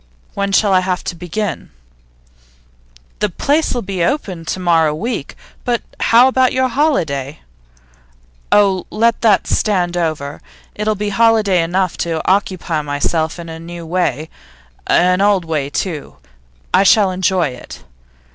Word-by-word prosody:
'When 200 0 -2
shall 200 0 +3
I 185 - +5
have 185 -1 -2
to 180 - -4
begin?' 180 +1 -4 1.5
'The 210 - +1
place'll 280 - 0
be 190 -3 -2
opened 185 - -2
to 185 - -2
morrow 165 -4 +2
week. 220 - -4 0.3
But 240 -1 -1 0.2
how 240 +3 +5
about 260 -1 +2
your 260 0 +1
holiday?' 160 - -1 1.1
'Oh, 195 -3 +3
let 230 +1 +1
that 215 -4 +3
stand 180 -5 0
over. 155 -4 -3 0.3
It'll 210 +1 -1
be 210 +1 -3
holiday 215 -3 +3
enough 180 +2 -1
to 165 -2 -2
occupy 185 -4 0
myself 155 +3 -1
in 170 -1 -8
a 160 0 -8
new 170 0 -8
way. 160 -3 -2 0.6
An 180 +1 +3
old 200 -3 +2
way, 150 -4 -2
too; 155 -1 -4 0.6
I - - +5
shall 200 0 +4
enjoy 185 -3 +1
it. 125 -1 -11
185 Hz, 135 wpm, -17 LUFS, 165-210 Hz, 1.5 s, I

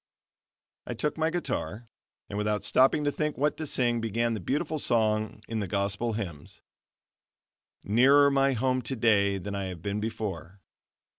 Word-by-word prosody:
I 120 - -4
took 150 +6 -1
my 160 0 +1
guitar, 120 - -3 0.4
and - - -7
without 105 0 -1
stopping 135 +3 +4
to 145 - +1
think 150 +1 -2
what 145 +3 +1
to 155 - -4
sing, 120 -3 +1
began 115 +1 0
that 110 - -3
beautiful 145 - -2
song 110 -3 +1
in 115 -1 -3
the 100 - -2
Gospel 100 +4 -1
Hymns: 90 -9 -7 1.2
"Nearer 140 +7 +5
my 135 0 +3
home, 130 +1 0
today, 110 -5 +2
than 100 +2 -6
I 100 -1 -3
have 90 -3 -7
been 100 +1 -2
before." 100 -5 -5
115 Hz, 155 wpm, -28 LUFS, 100-135 Hz, 1.2 s, Nearer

